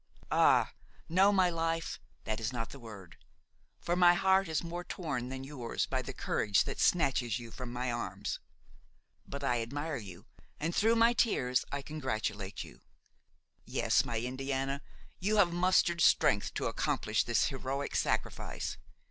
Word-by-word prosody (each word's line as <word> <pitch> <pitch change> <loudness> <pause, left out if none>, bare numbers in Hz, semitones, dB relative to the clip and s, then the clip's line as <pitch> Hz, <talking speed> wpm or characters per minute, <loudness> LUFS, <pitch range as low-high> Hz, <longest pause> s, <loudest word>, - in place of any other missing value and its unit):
Ah! - - +4 0.3
no, 190 +4 +5
my 185 -3 +3
life, 165 0 -2 0.2
that 110 0 -2
is 110 +2 -2
not 115 -3 -4
the 140 - -10
word; 100 -7 -11 0.6
for 175 - -1
my 175 -1 +6
heart 190 +1 +3
is 160 +1 -1
more 175 +1 -5
torn 140 -9 -4
than 130 0 -5
yours 135 -4 -3
by - - -1
the - - -6
courage 105 -1 +1
that - - -5
snatches 130 -9 +2
you 120 -2 -9
from 125 0 -7
my 125 0 -2
arms. 120 0 -3 0.9
But 140 0 -6
I 125 -3 +1
admire 145 +6 -3
you; 95 -6 -10 0.3
and, 165 +3 -2
through 225 +2 +4
my 230 +1 +5
tears, 125 - +1
I 140 -1 -3
congratulate 110 -9 -3
you. - - -14 0.8
Yes, - - +2
my 115 -2 -2
Indiana, 135 +3 -2 0.4
you 205 +4 +1
have 175 -4 +4
mustered 175 -1 +3
strength 100 -8 +4
to - - -1
accomplish 110 0 0
this 120 +3 +2
heroic 135 0 -3
sacrifice. - - -2
135 Hz, 155 wpm, -32 LUFS, 120-175 Hz, 0.9 s, my